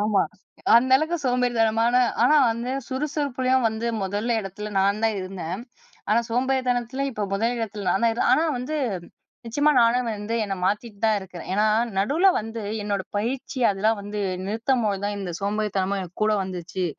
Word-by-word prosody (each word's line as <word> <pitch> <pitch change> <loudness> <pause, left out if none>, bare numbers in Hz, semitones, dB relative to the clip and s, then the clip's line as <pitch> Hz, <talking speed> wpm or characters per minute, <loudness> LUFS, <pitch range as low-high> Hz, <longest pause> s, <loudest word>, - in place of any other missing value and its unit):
ஆமா. 210 -1 +3 0.5
அந்த 255 +2 +3
அளவுக்கு 315 +4 -1
சோம்பேறித்தனமானா 240 -1 +2 0.2
ஆனா 300 +5 +5
வந்து 235 +2 -3 0.2
சுறுசுறுப்புலயும் 260 -3 0
வந்து 220 +1 -4
மோதல் 205 +4 -2
இடத்துல 210 +1 -6
நான் 200 +2 +2
தான் 220 -2 +1
இருந்தேன். 185 0 -5 0.5
ஆனா 230 +2 +4
சோம்பேறித்தனத்தில 255 +1 0
இப்போ 215 -4 -4
முதல் 230 +4 0
இடத்துல 210 -3 -4
நான்தான் 230 +5 +1
ஆனா 320 - +4
வந்து 280 +5 -3 0.7
நிச்சியமா 290 +6 +2
நானும் 235 +1 +3
வந்து 210 +2 -4
என்ன 195 - -3
மாத்திட்டு 210 +1 -2
தான் 220 -1 +4
இருக்குறேன். 180 -2 -10
ஏனா 210 +2 +3 0.3
நடுவுல 305 - +3
வந்து 225 +1 -6 0.2
என்னோட 200 -2 -1
பயிற்சி 255 +5 -3
அதெல்லாம் 210 +2 +1
வந்து 205 +1 -5 0.3
நிறுத்தம்போது 220 -2 0
தான் 205 0 -2
இந்த 185 -3 -4
சோம்பேறித்தனமும் 200 -1 -1
என் 180 0 -13
கூட 215 0 +3
வந்துச்சு 180 0 -4
220 Hz, 150 wpm, -24 LUFS, 200-250 Hz, 0.7 s, ஆனா